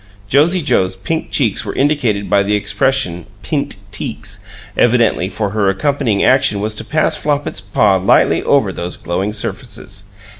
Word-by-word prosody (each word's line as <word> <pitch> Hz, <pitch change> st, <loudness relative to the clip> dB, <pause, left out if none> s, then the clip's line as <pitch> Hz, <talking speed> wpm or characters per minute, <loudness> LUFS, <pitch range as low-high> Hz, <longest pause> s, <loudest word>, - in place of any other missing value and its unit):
(Josie 160 Hz, -, +3 dB
Joe's 95 Hz, -9 st, +1 dB
pink 160 Hz, +12 st, -3 dB
cheeks 115 Hz, -9 st, +1 dB
were 100 Hz, -, -5 dB
indicated 130 Hz, -8 st, 0 dB
by 100 Hz, -, +3 dB
the 100 Hz, +1 st, 0 dB
expression 105 Hz, -5 st, 0 dB, 0.2 s
"pint -, -, -2 dB, 0.2 s
teeks," -, -, -4 dB, 0.4 s
evidently, 115 Hz, -6 st, +2 dB
for 105 Hz, -1 st, -3 dB
her 105 Hz, -2 st, +1 dB
accompanying 110 Hz, -1 st, 0 dB
action 130 Hz, -6 st, +3 dB
was 105 Hz, +2 st, -1 dB
to 110 Hz, -, -5 dB
pass 155 Hz, +7 st, +1 dB
Flopit's 145 Hz, -9 st, -2 dB
paw 100 Hz, 0 st, +2 dB
lightly 95 Hz, +1 st, +3 dB
over -, -, +2 dB
those 90 Hz, +1 st, -4 dB
glowing 95 Hz, +4 st, -2 dB
surfaces.) 100 Hz, -1 st, -5 dB
105 Hz, 150 wpm, -16 LUFS, 100-135 Hz, 0.4 s, Josie